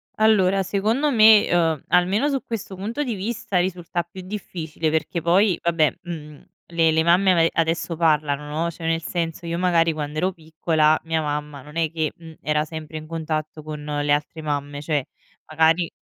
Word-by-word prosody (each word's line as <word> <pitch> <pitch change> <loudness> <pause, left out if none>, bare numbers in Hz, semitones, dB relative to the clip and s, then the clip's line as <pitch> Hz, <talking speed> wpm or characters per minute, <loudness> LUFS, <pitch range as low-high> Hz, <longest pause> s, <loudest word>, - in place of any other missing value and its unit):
Allora 195 -3 +3
secondo 220 +10 0
me, 220 -2 +7
ehm, 165 -4 +1
almeno 200 +11 +3
su 270 -2 -1
questo 205 -4 -5
punto 225 +10 -3
di 245 -4 -2
vista 210 0 -3
risulta 175 -1 -2
più 185 +2 -11
difficile 170 -5 -4
perché 160 +2 -1
poi 180 +2 +3
vabbè, 165 -4 +2
mhmm, 150 -4 -8 0.3
le 165 -1 +3
le 160 0 +2
mamme 185 +3 +4
a - - +3
me 165 -1 +4
adesso 165 0 0
parlano, 150 -3 +1 0.2
no; 170 - -1
cioè, 165 - -9
nel 165 0 0
senso 170 -1 -3
io 170 0 -2
magari 170 -3 +3
quand'ero 155 +5 -2
piccola, 160 -1 +1
mia 160 -1 -1
mamma 150 -1 -4
non 150 +4 -14
è 160 -2 +1
che, 160 -2 -1
mhmm, 165 -1 -12
era 150 0 0
sempre 155 0 -7
in 155 - -8
contatto 155 -1 -4
con 150 -1 -7
le 145 -1 -1
altre 150 +2 -1
mamme; 145 -1 -3
cioè, 145 -3 -1 0.4
magari 160 +2 +2
165 Hz, 180 wpm, -23 LUFS, 155-185 Hz, 0.4 s, me